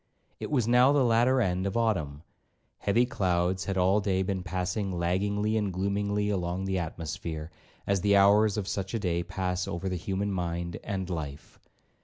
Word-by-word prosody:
It - - -5
was 125 -7 +1
now 125 +3 +5
the 145 -3 +3
latter 120 +3 +3
end 95 -2 0
of 100 - -2
Autumn; 85 -11 -1 0.6
heavy 115 +5 +2
clouds 95 -6 0
had 100 -1 -2
all 95 +3 +3
day 95 -2 +1
been 95 0 -2
passing 90 +3 -2
laggingly 100 +5 0
and 105 -3 0
gloomily 100 +2 -1
along 90 0 -2
the 95 -1 0
atmosphere, 80 -1 -5 0.3
as 100 -2 +1
the 100 0 +3
hours 100 +1 +5
of 100 -3 -2
such 100 +2 -3
a - - 0
day 85 -4 0
pass 90 +1 -2
over 85 +2 -4
the 95 - -1
human 95 +3 -2
mind 85 -2 -3
and 95 -2 -3
life. 75 -6 -6
95 Hz, 175 wpm, -28 LUFS, 90-105 Hz, 0.6 s, now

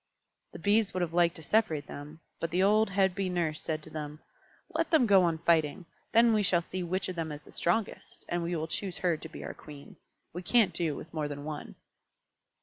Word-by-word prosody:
The - - -7
Bees 205 -1 +2
would 185 - 0
have 170 -2 -1
liked 170 -1 +3
to 160 - -8
separate 160 -8 +1
them, 150 +3 -9 0.2
but 165 - -2
the 180 +3 +2
old 215 +2 +4
head 195 -1 +2
Bee 195 0 -2
Nurse 170 -4 -1
said 155 -1 -3
to - - -10
them, 150 -1 -6 0.5
"Let - - 0
them 315 -7 +5
go 200 -3 +6
on 170 -2 +2
fighting; 165 +1 +1 0.3
then 230 0 +5
we 215 - +3
shall 175 -3 +3
see 185 +2 -5
which 185 +2 -2
of 185 - -4
them 165 -2 -3
is 150 0 -8
the - - -16
strongest, 190 +5 -2
and 175 0 -1
we 170 +1 -2
will 160 -1 -1
choose 185 +2 -2
her 175 -3 +1
to 160 +1 -9
be - - -9
our - - -5
Queen. 145 -2 -12 0.4
We 175 - -5
can't 210 0 +3
do 160 -4 0
with 160 - -9
more 155 -2 -1
than 145 -1 -6
one." 150 -1 -6
175 Hz, 230 wpm, -30 LUFS, 155-195 Hz, 0.5 s, go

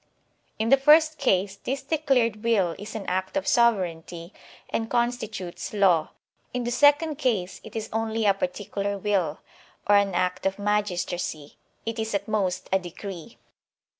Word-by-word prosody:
In 220 +1 0
the 275 - +7
first 310 +3 +5
case, 195 -7 +1
this 270 +6 -4
declared 265 -8 +1
will 200 -7 +2
is 210 +3 -8
an 210 -3 -5
act 190 +7 -2
of 290 - -2
sovereignty 180 -6 +1 0.4
and 225 0 -2
constitutes 225 -7 -2
law; 180 -6 +3 0.5
in 250 - -1
the 240 - -2
second 290 +3 +4
case, 205 -10 -1
it 220 - -12
is 220 -1 -3
only 225 0 -1
a 200 - +5
particular 200 -3 -3
vnll, 190 -6 0 0.5
or 205 0 +5
an 200 -2 +1
act 180 +2 0
of 195 - -2
magistracy 180 -7 -2 0.2
*— - - -42
it 225 0 -3
is 220 -1 -2
at 200 0 -2
most 185 -4 -1
a 190 - +4
decree. 180 +2 -9
210 Hz, 160 wpm, -25 LUFS, 185-235 Hz, 0.5 s, the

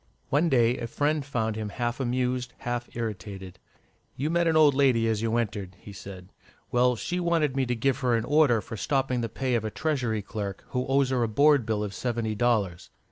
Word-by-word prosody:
One 155 +5 +2
day 120 -2 +3
a 115 - -3
friend 150 +4 0
found 115 -5 -2
him 110 -1 -4
half 120 +4 -3
amused, 125 -1 -1
half 120 0 -4
irritated. 95 -5 -6 0.6
"You 150 +4 -2
met 170 0 +2
an 160 - +2
old 150 -2 +6
lady 130 -5 +3
as 110 -1 0
you 115 0 0
entered," 105 -5 -3
he 100 - -11
said. 95 -1 -10 0.4
"Well, 125 0 +3
she 180 +9 -3
wanted 165 -6 +1
me 135 -2 0
to 125 - 0
give 130 +3 0
her 125 -3 +2
an 115 0 -1
order 140 -5 +4
for 115 - -8
stopping 135 -1 0
the 115 - -2
pay 130 +3 -2
of 115 -2 +1
a 110 - -2
Treasury 120 -6 -1
clerk 100 -1 -5
who 125 0 -2
owes 135 0 +2
her 130 -2 +1
a 115 - +2
board 140 +2 +4
bill 105 -2 0
of 100 -1 -4
seventy 115 -2 -2
dollars." 105 -6 0
120 Hz, 210 wpm, -27 LUFS, 110-135 Hz, 0.6 s, old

